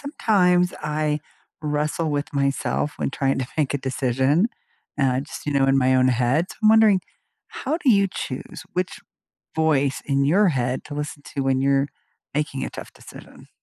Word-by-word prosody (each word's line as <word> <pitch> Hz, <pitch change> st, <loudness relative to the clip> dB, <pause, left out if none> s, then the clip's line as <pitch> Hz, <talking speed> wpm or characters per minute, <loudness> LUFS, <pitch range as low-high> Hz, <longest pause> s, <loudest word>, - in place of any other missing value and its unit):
sometimes 180 Hz, -10 st, +2 dB
I 150 Hz, 0 st, -1 dB, 0.4 s
wrestle 150 Hz, +1 st, -1 dB
with 145 Hz, 0 st, -2 dB
myself 140 Hz, +1 st, 0 dB
when -, -, -2 dB
trying 135 Hz, -1 st, 0 dB
to 130 Hz, -, -2 dB
make 145 Hz, -3 st, 0 dB
a -, -, +1 dB
decision, 130 Hz, -, +1 dB, 0.5 s
and 135 Hz, -3 st, +2 dB
I 130 Hz, -, 0 dB
just, 150 Hz, +1 st, -9 dB
you 145 Hz, -, 0 dB
know, 135 Hz, -1 st, +3 dB
in 135 Hz, 0 st, +4 dB
my 130 Hz, 0 st, +3 dB
own 130 Hz, 0 st, +4 dB
head. 125 Hz, +7 st, +2 dB
So, -, -, -10 dB
I'm 215 Hz, -, +6 dB
wondering, 215 Hz, -3 st, +6 dB, 0.5 s
how 300 Hz, +5 st, -3 dB
do 280 Hz, -, +3 dB
you 200 Hz, -3 st, +4 dB
choose 130 Hz, -, -6 dB
which 180 Hz, -1 st, -2 dB, 0.6 s
voice 145 Hz, -4 st, +1 dB
in 140 Hz, -1 st, +1 dB
your 190 Hz, +7 st, +4 dB
head 125 Hz, -3 st, -1 dB
to 145 Hz, -, -8 dB
listen 145 Hz, 0 st, -5 dB
to 140 Hz, -, -1 dB
when 135 Hz, -1 st, +1 dB
you're 140 Hz, 0 st, +2 dB, 0.5 s
making 145 Hz, -2 st, -1 dB
a -, -, -3 dB
tough -, -, -10 dB
decision? -, -, -14 dB
145 Hz, 180 wpm, -23 LUFS, 135-170 Hz, 0.6 s, I'm